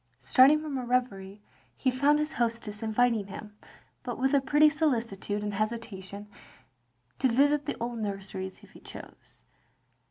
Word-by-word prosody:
Starting 275 +4 +5
from 300 -3 -4
a - - -4
reverie, 210 -5 -2 0.3
he 260 - +1
found 280 +4 +3
his 300 +1 -2
hostess 230 -3 -2
inviting 225 -1 +1
him, 210 +1 -9 0.5
but 245 -2 -5
with 265 +2 +1
a 280 - +4
pretty 295 +3 +5
solicitude 230 -10 -1
and 205 0 -3
hesitation, 210 -2 -4 0.9
to 265 - +3
visit 285 +4 +2
the - - -2
old 235 0 -3
nurseries 195 -2 -5
if - - -17
he - - -15
chose. - - -13
235 Hz, 150 wpm, -28 LUFS, 210-275 Hz, 0.9 s, Starting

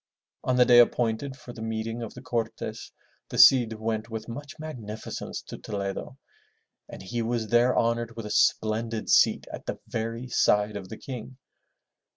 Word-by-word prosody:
On 130 - +1
the 125 0 +6
day 120 0 +7
appointed 120 +3 +2
for 125 -2 -11
the 110 - -9
meeting 110 +1 -3
of 115 - -6
the - - -10
Cortes, 115 -2 -4 0.4
the - - -5
Cid 120 -4 +7
went 110 0 -3
with 110 -1 -6
much 140 +4 -8
magnificence 115 -9 -6
to - - -9
Toledo, 100 +5 -4 0.7
and - - -9
he 115 +5 -3
was 115 -1 -2
there 120 +1 +4
honored 115 0 0
with 115 -2 -6
a 105 - -5
splendid 110 +1 +1
seat - - +5
at - - -8
the - - -3
very 115 +2 -4
side 105 -3 +2
of 95 -2 -6
the - - -7
King. 125 -1 -8
115 Hz, 170 wpm, -27 LUFS, 110-120 Hz, 0.7 s, day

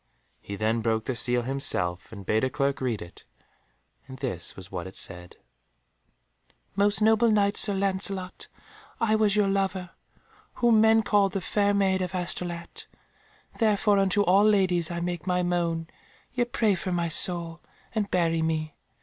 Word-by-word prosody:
He 100 - -7
then 110 +3 0
broke 110 -1 -1
the 130 - -2
seal 120 0 +1
himself, 90 -9 -2
and 100 -3 -10
bade 110 +4 +1
a 130 - +1
clerk 140 0 -1
read 120 -5 -2
it, 85 - -15 0.8
and 130 -1 -10
this 120 -11 -5
was 95 0 -11
what 90 -1 -5
it 95 - -12
said— 90 -1 -5 1.4
"Most 205 +1 +2
noble 220 +2 +4
Knight 205 -1 +2
Sir 205 - +4
Lancelot, 190 -1 -1 0.5
I 225 -1 +1
was 215 -2 +2
your 210 -1 +3
lover, 195 -2 -1 0.6
whom 235 -3 +3
men 220 0 +4
called 200 -2 +2
the 195 - -1
Fair 205 +2 +1
Maid 190 -1 +1
of 185 0 -3
Astolat: 175 -1 -3 0.7
therefore 210 -2 +2
unto 195 +1 +3
all 195 +2 +4
ladies 185 -5 +2
I 170 -1 -4
make 175 -1 -4
my 180 0 +1
moan; 170 -2 -1 0.5
yet 240 -1 -1
pray 215 -3 +2
for 185 0 -4
my 170 -1 0
soul, 170 0 +1 0.3
and 210 -2 -1
bury 165 -3 +1
me. 155 -1 -2
180 Hz, 160 wpm, -26 LUFS, 140-200 Hz, 1.4 s, noble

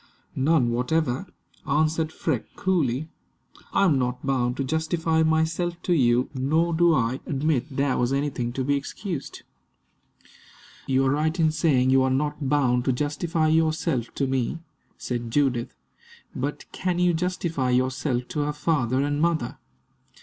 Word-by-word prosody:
"None 135 -3 +2
whatever," 125 +5 0 0.4
answered 155 +2 +1
Freke, 145 -8 -3
coolly. 155 -6 0 0.6
"I 195 - +3
am 150 -8 +3
not 125 +1 -2
bound 125 -2 0
to 135 - 0
justify 160 +2 0
myself 160 +2 +1
to 180 - +1
you, 125 -4 +3
nor 155 +6 +1
do 170 0 +4
I 125 +1 0
admit 145 -2 0
there 140 -1 +1
was 120 +1 +1
anything 135 -4 -1
to 130 - -2
be 145 +2 +1
excused." 145 +2 -5 1.4
"You 135 0 +2
are 130 - +3
right 155 +4 0
in 160 -1 +4
saying 135 -5 +2
you 135 0 +5
are 130 - +2
not 145 +1 -1
bound 125 -4 +2
to 130 - +3
justify 155 +4 0
yourself 160 -5 +1
to 140 - 0
me," 130 +2 -1 0.4
said 120 -2 -4
Judith; 125 -2 0 0.6
"but - - -3
can 180 -2 -2
you 180 0 +3
justify 165 -5 -1
yourself 125 0 0
to 150 - -3
her 145 0 0
father 145 -4 0
and 145 +1 -1
mother? 165 -7 0
145 Hz, 150 wpm, -25 LUFS, 130-160 Hz, 1.4 s, you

